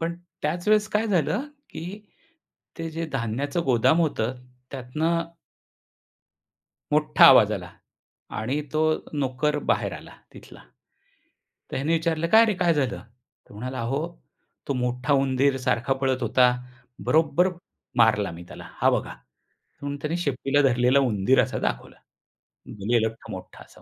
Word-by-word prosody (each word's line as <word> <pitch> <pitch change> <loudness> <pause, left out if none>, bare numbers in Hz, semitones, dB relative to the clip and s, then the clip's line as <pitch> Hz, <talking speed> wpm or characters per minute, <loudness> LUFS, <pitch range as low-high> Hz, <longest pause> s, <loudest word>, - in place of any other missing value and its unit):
पण 165 +1 -2 0.3
त्याच 170 +5 -2
वेळेस 215 0 +3
काय 215 +1 0
झालं, 200 - 0 0.2
की 180 +6 -7 0.8
ते 165 - -4
जे 165 +1 -4
धान्याचं 135 +6 -2
गोदाम 130 +6 +3
होतं 130 -7 0 0.4
त्यातनं 160 +6 -2 1.6
मोठा 150 0 +4
आवाज 115 -6 +6
आला 90 -4 -5 0.7
आणि 130 +7 -1
तो 155 - 0 0.3
नोकर 145 +1 -1
बाहेर - - 0
आला - - -9 0.2
तिथला. - - -14 1.1
तर - - -4
ह्याने 145 +5 0
विचारलं, 165 0 0
"काय 220 +5 +7
रे 215 - +1
काय 170 -2 +3
झालं?" 135 -4 -1 0.5
तो - - -15
म्हणाला, 130 +4 -5
"अहो, 125 +5 -1 0.7
तो 140 - 0
मोठा 125 +2 -1
उंदीर 135 0 +2
सारखा 125 +3 +1
पळत 130 -1 0
होता, 125 -1 +4 0.6
बरोबर 165 +3 +3 0.5
मारला 110 -4 +3
मी 85 +1 -10
त्याला - - -10
हा - - +5
बघा." - - -1
म्हणून 140 0 -11
त्याने 155 +3 -1
शेपटीला 140 +1 +1
धरलेला 125 +3 +3
उंदीर 105 +6 +3
असा - - -3
दाखवला. - - -8 0.9
गलेलठ्ठ 110 0 0
मोठा - - -9
असा - - -20
140 Hz, 135 wpm, -25 LUFS, 125-165 Hz, 1.6 s, काय